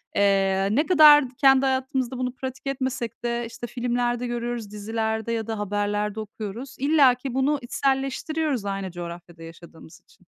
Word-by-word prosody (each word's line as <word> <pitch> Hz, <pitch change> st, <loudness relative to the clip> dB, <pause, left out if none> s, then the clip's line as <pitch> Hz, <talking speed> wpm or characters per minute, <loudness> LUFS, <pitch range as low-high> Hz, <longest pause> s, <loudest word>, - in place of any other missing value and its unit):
Eee, 195 Hz, -1 st, +2 dB
ne 285 Hz, +9 st, +2 dB
kadar 305 Hz, -5 st, +8 dB
kendi 270 Hz, -1 st, +5 dB
hayatımızda 260 Hz, -1 st, -1 dB
bunu 250 Hz, -1 st, -2 dB
pratik 260 Hz, +1 st, -7 dB
etmesek 255 Hz, -4 st, -3 dB
de, 235 Hz, 0 st, -1 dB
işte, 235 Hz, +1 st, -8 dB
filmlerde 245 Hz, 0 st, -1 dB
görüyoruz, 240 Hz, -3 st, -4 dB
dizilerde 220 Hz, +1 st, -3 dB
ya 225 Hz, -1 st, -2 dB
da 220 Hz, -2 st, -3 dB
haberlerde 205 Hz, +1 st, -2 dB
okuyoruz. 220 Hz, +4 st, -7 dB
İlla 280 Hz, -3 st, +5 dB
ki 255 Hz, 0 st, -6 dB
bunu 270 Hz, +2 st, +1 dB
içselleştiriyoruz 270 Hz, 0 st, -1 dB
aynı 195 Hz, -1 st, -3 dB
coğrafyada 170 Hz, -1 st, -9 dB
yaşadığımız 165 Hz, -1 st, -13 dB
için. -, -, -25 dB
240 Hz, 145 wpm, -24 LUFS, 205-265 Hz, -, kadar